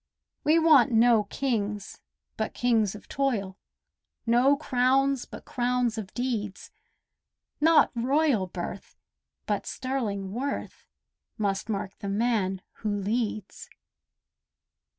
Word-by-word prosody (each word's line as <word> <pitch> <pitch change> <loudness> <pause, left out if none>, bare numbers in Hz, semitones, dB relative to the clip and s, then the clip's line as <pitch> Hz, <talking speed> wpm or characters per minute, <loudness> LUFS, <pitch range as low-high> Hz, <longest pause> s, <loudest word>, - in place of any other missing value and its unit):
We 310 +2 +4
want 310 -7 +6
no 225 -2 +5
kings 210 -5 -3 0.4
but - - -3
kings 225 -5 +2
of 210 - -12
toil— 215 -9 -1 0.7
No 245 +5 +4
crowns 270 -1 +2
but - - -11
crowns 245 -2 0
of 215 -3 -6
deeds; 225 -6 -3 0.9
Not 320 +2 +5
royal 255 -3 +2
birth 180 +2 -7 0.5
but - - -2
sterling 215 -8 -3
worth 275 +5 -4 0.5
Must 200 -1 -1
mark 200 -2 -4
the 200 - -4
man 200 -3 0
who 215 - -3
leads. 215 0 -3
230 Hz, 105 wpm, -27 LUFS, 205-260 Hz, 0.9 s, want